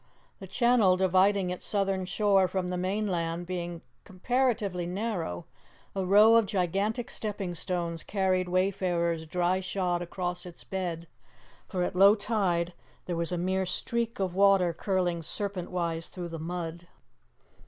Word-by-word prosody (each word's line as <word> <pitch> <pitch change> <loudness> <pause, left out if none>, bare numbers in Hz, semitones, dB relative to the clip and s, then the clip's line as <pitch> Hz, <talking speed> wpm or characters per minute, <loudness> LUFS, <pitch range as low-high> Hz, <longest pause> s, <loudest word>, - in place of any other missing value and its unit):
The 190 - -9
channel 215 -2 +3
dividing 190 0 +3
its 180 - -6
southern 195 -2 0
shore 195 0 +3
from 180 -1 -2
the 180 - -2
mainland 180 -3 -1
being 175 -2 -5 0.2
comparatively 200 -3 0
narrow, 180 - -3 0.5
a 195 - 0
row 210 +5 +7
of 225 -3 +3
gigantic 200 +6 -1
stepping 200 -4 -4
stones 170 -1 -3
carried 185 -2 0
wayfarers 175 -3 0
dry 180 +3 +1
shod 180 -2 -1
across 175 0 -4
its 175 -2 -10
bed, 175 -3 -4 0.6
for 185 -3 -1
at 180 - -2
low 200 +3 +7
tide 190 -5 0 0.3
there 175 - -2
was 170 +1 -2
a 180 - -1
mere 185 +2 0
streak 230 +5 -2
of 190 -2 -1
water 195 -2 +4
curling 180 -1 -1
serpent 190 +2 -3
wise 170 -2 -2
through 175 -2 -7
the 165 -1 -6
mud. 170 +1 -5
185 Hz, 145 wpm, -29 LUFS, 175-195 Hz, 0.6 s, row